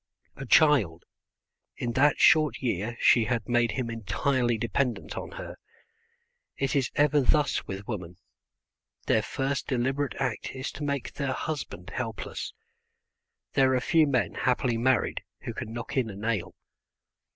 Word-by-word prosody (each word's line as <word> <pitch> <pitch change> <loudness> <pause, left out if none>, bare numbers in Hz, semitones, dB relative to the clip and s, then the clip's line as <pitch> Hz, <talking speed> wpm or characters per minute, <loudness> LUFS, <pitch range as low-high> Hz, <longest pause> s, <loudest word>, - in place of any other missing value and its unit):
A 135 - -8
child! 120 - +4 0.7
In 120 - -2
that 140 +5 +3
short 155 -1 +5
year 115 -1 -2
she 115 -3 +5
had 115 -1 -1
made 120 -2 +2
him 125 0 -2
entirely 120 +3 0
dependent 120 +3 -1
on - - -6
her. - - -8 1.0
It 135 0 -1
is 135 -3 +2
ever 145 0 +4
thus 145 +3 +2
with 100 +1 -6
women: 90 -6 -5 0.9
their - - +3
first 135 +1 -2
deliberate 135 +2 -1
act 125 -2 -3
is 130 0 -4
to 145 - -7
make 140 -3 -2
their 140 -2 -2
husband 130 - -5
helpless. 115 -4 -4 1.0
There 130 -1 +4
are - - +3
few 160 +3 +3
men 130 -4 +1
happily 125 -2 0
married 130 0 +1 0.2
who - - -5
can 110 - -6
knock 120 +1 -6
in 130 -4 +1
a 100 - -7
nail. 105 -3 -2
125 Hz, 145 wpm, -27 LUFS, 115-140 Hz, 1.0 s, short